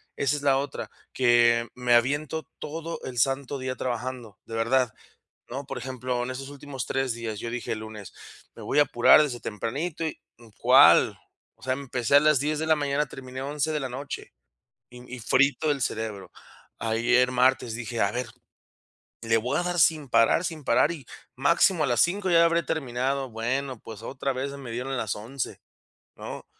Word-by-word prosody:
esa 140 +1 +1
es 145 - -5
la 135 -1 +4
otra, 140 0 -5 0.2
que 120 -2 +4
me 125 -1 +2
aviento 145 +5 0
todo 165 +2 -5
el 125 -1 -7
santo 135 +3 0
día 130 -1 -4
trabajando, 125 -3 -4
de 115 - -10
verdad, 115 +1 +1 0.6
¿no?, 135 +2 -5
por - - -5
ejemplo, 125 0 -3
en 130 - -4
estos 135 +1 -7
últimos 140 -2 -7
3 135 -2 0
días, 115 -2 -5
yo 115 - -5
dije, 120 0 -3
el 110 - -5
lunes: 110 -3 -9 0.4
"Me - - -10
voy - - +1
a - - +8
apurar 135 +1 +6
desde 130 -5 -2
tempranito 140 +12 -4
y", 160 - -3 0.4
¿cuál? - - +6 0.4
O - - -32
sea, 130 - -1
empecé 130 -1 -1
a - - +10
las 150 -2 +4
10:00 150 +2 -1
de 160 - -2
la 160 - +4
mañana, 145 0 0
terminé 130 -1 -8
11:00 150 +2 -1
de 150 - -1
la 135 - -3
noche. 135 +3 -7 0.6
Y 125 - -12 0.2
y - - -10
frito 140 +6 +2
del 145 -2 +1
cerebro. 110 -5 -3 0.5
Ayer 120 +3 +2
martes, 125 -1 +2
dije: 115 0 -3
"A 100 - +2
ver, 125 +4 -3 1.0
le 115 0 +3
voy 120 +3 -1
a - - 0
dar 175 0 -1
sin 150 -4 +3
parar 115 +9 +4
sin 160 -4 -5
parar 135 +5 +3
y, 145 -7 -9 0.3
máximo 165 +4 +3
a - - -2
las 120 - +2
5:00 190 +3 +1
ya 170 -1 +6
habré 170 0 +2
terminado". 135 -3 -2
Bueno, 130 +3 -2
pues, 110 0 -10
otra 135 +3 -3
vez 130 +2 -3
me 140 -3 -8
dieron 125 +4 -3
las 110 -5 -2
11:00 115 +5 -5 0.6
¿no? - - -8
130 Hz, 185 wpm, -26 LUFS, 120-145 Hz, 1.0 s, a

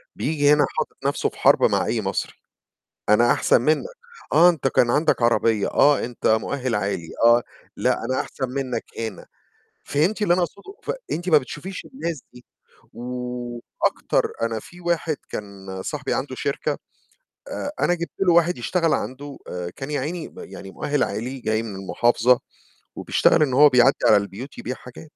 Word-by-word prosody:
بييجي 145 -2 +2
هنا 150 - +4
حاطط 155 - -2
نَفْسه 140 - +1
في - - -18
حَرب - - +4
مع - - +1
أي - - 0
مصري، - - -2 0.8
أنا 110 +3 +5
أحسن - - +3
منّك، 155 +6 +1 0.5
آه، 165 +4 +7
أنت 155 -6 -1
كان 120 -2 +3
عندك 145 -1 +2
عربية، 115 -2 +2
آه، 145 0 +4
أنت 120 0 -5
مؤهل 125 +3 +1
عالي 100 -5 -2 0.2
آه، 120 +1 +6 0.3
لأ، - - 0
أنا 130 +2 0
أحسن 130 -2 -4
منّك 130 -3 -3
هنا، 115 -1 -5 0.6
فهمتي 180 +9 +1
اللي 175 - +4
أنا 180 0 +2
أقصده؟ 200 - -8
فأنتِ 185 - -4
ما 155 - +7
بتشوفيش 150 +7 -6
الناس 170 - -4
دي، 125 0 -15 0.5
وأكتر 125 -1 -2
أنا 115 -1 -1
في 175 +10 -14
واحد 170 -2 0
كان 95 -2 -7
صاحبي - - -3
عنده 135 -1 -3
شركة 140 +2 -2 0.7
آآ 290 -12 -4
أنا - - +3
جبت 170 -2 -3
له 180 -3 +4
واحد 170 +1 +3
يشتغل 165 +6 +1
عنده 140 +2 -4
آآ 90 -1 -5
كان 135 +10 -7
يعيني 155 +4 -3
م - - -14
يعني 95 0 -9
مؤهل 145 +9 0
عالي 125 +4 -4
جاي 110 -1 -1
من 110 -4 -6
المحافظة 120 +5 +2 0.6
وبيشتغل - - +3
إن 135 -4 0
هو 145 +3 +7
بيعدّي 125 +1 +5
على 105 - +7
البيوت 100 +7 -5
يبيع 125 - -4
حاجات. 125 +3 -12
130 Hz, 165 wpm, -23 LUFS, 115-155 Hz, 0.8 s, آه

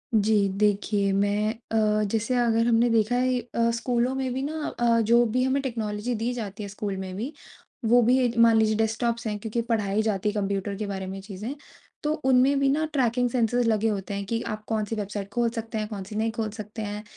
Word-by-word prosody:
जी 210 -1 +3
देखिए 205 -1 +2
मैं 205 +2 +1 0.2
अ, 215 -1 +2
जैसे 230 +3 0
अगर 230 -1 +2
हमने 235 0 +4
देखा 230 +1 +2
है 255 0 +2
अ, 235 0 0
स्कूलों 240 +2 0
में 260 -2 -2
भी 260 - -2
ना 310 +2 -3 0.2
अ, 235 -1 +3
जो 235 +2 +4
भी 245 +3 +1
हमें 265 +1 +1
टेक्नोलॉजी 225 -2 -3
दी 230 +3 -1
जाती 210 -3 -5
है 200 - -6
स्कूल 200 -1 -4
में 190 -1 -5
भी, 240 +10 -4 0.5
वो 240 +2 +5
भी 245 0 +3
मान 230 -1 +6
लीजिए 220 0 +3
डेस्कटॉप्स 230 +2 0
हैं, 210 -1 -2
क्योंकि 225 +2 -2
पढ़ाई 210 -2 +1
जाती 210 -2 0
है - - -3
कंप्यूटर 200 0 -1
के 210 - -3
बारे 190 -1 -4
में 190 +1 -5
चीज़ें। 210 +6 -6 0.5
तो 300 0 +1
उनमें 265 +2 +4
भी 275 0 +3
ना 305 +3 +1
ट्रैकिंग 245 -2 +2
सेंसर्स 240 0 +1
लगे 220 0 +2
होते 200 -2 -3
हैं, 200 0 -3
कि 230 +3 -2
आप 215 -2 -5
कौन 220 -2 0
सी 225 - -4
वेबसाइट 205 -1 -4
खोल 235 0 +2
सकते 225 -1 -5
हैं? 215 -1 -2
कौन 205 -3 -6
सी 205 +3 -9
नहीं 220 +1 0
खोल 220 -1 -3
सकते 215 +1 -7
हैं? 210 0 -4
225 Hz, 220 wpm, -26 LUFS, 210-240 Hz, 0.5 s, मान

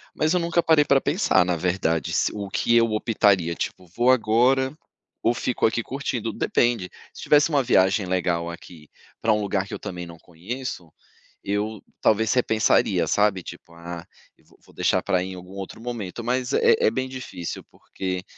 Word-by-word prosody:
mas 155 +2 +1
eu - - +3
nunca 170 0 +1
parei 160 -3 +4
pra 140 -2 +3
pensar, 145 - +2
na 90 0 0
verdade, 85 -3 -1
se - - +1
o 100 -1 -4
que 115 - +1
eu 115 - +5
optaria 100 -6 +2
tipo: 90 +1 -5
“Vou 120 +8 +2
agora, 130 +4 +2 0.5
ou 115 - +3
fico 125 0 -1
aqui 115 +1 +1
curtindo?”, 120 -3 -3
depende, 115 -2 0 0.2
se - - -11
tivesse 150 +2 +4
uma 145 -3 +2
viagem 95 -4 +3
legal 90 -2 -1
aqui, 85 -3 -12 0.3
pra 110 - +2
um 105 - 0
lugar 100 -1 -1
que - - -9
eu - - -5
também 90 -1 -6
não 85 0 -11
conheço, 90 +1 -7 0.5
eu, 105 +2 -2 0.2
talvez 110 0 +2
repensaria, 110 -4 +2
sabe, 105 -2 +2
tipo: 85 - -11
“Ah, 85 0 -8 0.4
vou - - -25
vou - - -21
deixar - - +1
pra 95 -3 +1
ir 95 - -5
em 95 - -7
algum 90 +1 -11
outro 95 +1 -8
momento”, 115 -3 -5
mas 125 +2 -1
é - - +5
é - - +4
bem 130 +3 -2
difícil, 130 -10 -6
porque, 95 -1 -5
105 Hz, 185 wpm, -24 LUFS, 90-125 Hz, 0.5 s, eu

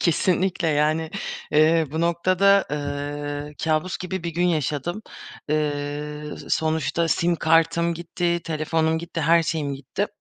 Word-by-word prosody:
Kesinlikle, 180 0 +1
yani, 155 +2 +1 0.4
eee, 155 +1 +4
bu 160 - -2
noktada, 185 +4 +3
ııı, 145 0 -4
kâbus 160 +3 0
gibi 185 0 -4
bir 170 - -1
gün 175 +1 +2
yaşadım. 160 - -1 0.5
Eee, 150 0 -2
s - - -11
sonuçta 160 +1 +1
sim 170 +2 +2
kartım 165 +1 +2
gitti, 170 +1 -1
telefonum 160 +1 0
gitti, 170 0 -5
her 165 +2 +4
şeyim 150 -4 -2
gitti. 140 +9 -3
160 Hz, 130 wpm, -24 LUFS, 150-170 Hz, 0.5 s, eee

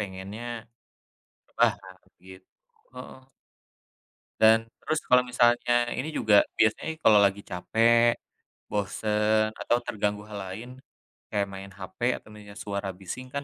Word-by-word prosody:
pengennya, 105 +4 -6 0.9
lah - - +4
harus 95 -1 -16
gitu, 95 0 -14 0.5
heeh. - - -10 1.2
Dan 110 +1 +5
terus 155 -1 -1
kalo 125 0 +6
misalnya 120 0 +2
ini 135 +5 -3
juga 105 -6 +4 0.2
biasanya 110 +8 +2
kalo 105 -2 +6
lagi 100 +1 0
capek, 115 +5 +2 0.6
bosen, 105 +1 0
atau 120 - 0
terganggu 105 0 -2
hal 105 -1 -8
lain, 115 +6 -8 0.6
kayak 100 -1 0
main 95 0 -9
HP 95 +2 -11 0.2
atau - - -17
mendengar 105 -1 -13
suara 100 -1 -4
bising 95 +7 -8
kan 140 0 -3
105 Hz, 125 wpm, -27 LUFS, 100-120 Hz, 1.2 s, kalo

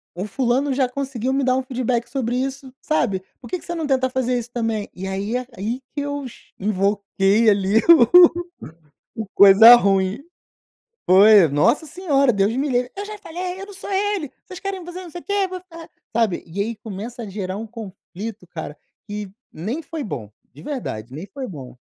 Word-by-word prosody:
O 185 +3 -4
fulano 260 +5 0
já 260 -1 +1
conseguiu 265 -2 -3
me 275 0 +1
dar 255 0 +2
um 265 - +1
feedback 250 -2 -2
sobre 245 -3 -2
isso, 265 0 -4
sabe, 215 -11 0 0.2
por 240 - -12
que 365 - -2
que - - -13
você 345 - -4
não 325 - -3
tenta 260 -1 +1
fazer 255 -1 0
isso 240 0 -6
também? 225 -3 -2
E 190 +1 -6
aí 195 +4 -3 0.2
aí 230 +6 -3
que 285 - -3
eu 285 -1 -4
cha 240 - -17
invoquei, 200 +1 +2
ali 200 0 +2
o 325 -7 +9 1.1
o 220 - -2
o - - -10
coisa 200 +4 +10
ruim. 195 +1 +1 0.9
Foi, 200 -1 +8
nossa 230 - +2
senhora, 285 -6 +1
Deus 200 +1 +1
me 275 +4 -1
livre! 250 -1 0
"Eu 400 - -4
já 425 0 -8
falei, 360 +1 -6
eu 390 - -7
não 405 - -11
sou 390 - -8
ele, 395 -6 -1
vocês 370 - -10
querem, 390 -2 -5
você 355 +2 -8
não 350 - -10
sei 350 - -8
o - - -20
quê, 400 -1 0
vou 370 0 -6
ficar" 335 -2 -13 0.3
sabe. 220 -6 0
E 175 +4 -5
aí 225 +3 -2
começa 225 +3 -7
a - - -6
gerar 190 -1 -4
um 220 +2 -5
conflito, 210 -2 -9
cara, 160 -3 -7 0.3
que 205 -1 -5 0.2
nem 220 - -4
foi 315 -1 -6
bom. 110 - -6 0.2
De 145 - -13
verdade, 130 - -5
nem 155 +8 -7
foi 265 +6 -7
bom. 135 -9 -10
240 Hz, 200 wpm, -21 LUFS, 200-285 Hz, 1.1 s, coisa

